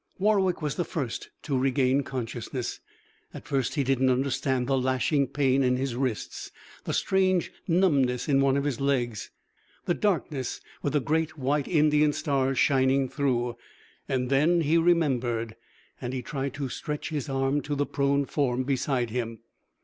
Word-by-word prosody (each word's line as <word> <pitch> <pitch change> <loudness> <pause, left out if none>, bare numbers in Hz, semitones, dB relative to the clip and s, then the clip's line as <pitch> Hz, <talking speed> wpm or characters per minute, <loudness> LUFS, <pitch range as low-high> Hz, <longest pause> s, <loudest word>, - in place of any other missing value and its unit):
Warwick 190 -4 +2
was 150 -2 0
the 175 - +1
first 145 -10 -4
to 145 - -1
regain 130 +1 +2
consciousness. 125 -1 -4 0.6
At - - -9
first 135 0 -1
he 145 - +1
didn't 130 0 +2
understand 130 0 0
the 135 +1 +1
lashing 130 +2 +1
pain 135 0 +2
in 125 -1 +3
his 130 -2 -2
wrists, 125 -4 -3 0.4
the - - -2
strange 185 -2 +1 0.2
numbness 145 -9 +2
in 135 -2 +3
one 135 0 +3
of 140 - 0
his 140 -3 -2
legs, 125 -6 -1 0.6
the 175 - +2
darkness 165 -10 -1 0.2
with 145 - -1
the 150 - +2
great 155 +3 -1
white 140 +1 0
Indian 150 -2 +3
stars 135 -2 0
shining 130 0 +3
through. 125 -3 -1 0.5
Then 135 +7 +2
he 155 +1 +2
remembered. 130 -10 +1 0.5
And 125 +1 -4
he 130 -1 -3
tried 135 +1 -4
to 145 -2 -3
stretch 150 +3 -4
his 150 -2 -3
arm 135 +2 +1
to 145 0 -3
the 145 0 0
prone 140 0 +1
form 130 -3 0
beside 130 -3 0
him. 115 -2 -3
135 Hz, 155 wpm, -27 LUFS, 130-150 Hz, 0.6 s, in